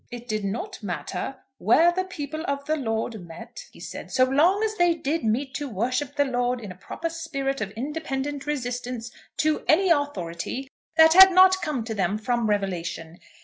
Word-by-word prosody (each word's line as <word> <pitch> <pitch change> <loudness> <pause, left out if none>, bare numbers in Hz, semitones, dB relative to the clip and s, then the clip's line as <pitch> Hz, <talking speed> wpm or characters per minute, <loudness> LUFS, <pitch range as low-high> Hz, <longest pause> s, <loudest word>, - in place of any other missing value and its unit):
"It 240 0 -9
did 215 -2 -2
not 360 - -4
matter 180 - -4 0.2
where 320 - +5
the 370 +2 -1
people 310 -3 -6
of 280 0 -2
the 310 - +1
Lord 225 - -3
met," 225 +9 -10
he - - -16
said, - - -8
"so 255 - +3
long 320 +11 +3
as 435 -1 -1
they 350 -2 +3
did 320 -1 -2
meet 255 +5 -1
to 285 +1 -4
worship 255 +6 -2
the 285 0 +3
Lord 245 -1 0
in 210 -5 -8
a - - -10
proper 325 - -5
spirit 290 -5 -3
of 200 - -2
independent 285 +2 -4
resistance 245 -4 -3 0.3
to 310 -1 +1
any 365 +3 +4
authority 265 - -2 0.3
that 320 0 +8
had 380 +1 +10
not 375 +1 +6
come 300 -8 -2
to 225 0 -4
them 200 -1 0
from 235 0 -1
revelation. 175 -4 -3
265 Hz, 185 wpm, -25 LUFS, 225-310 Hz, 0.3 s, had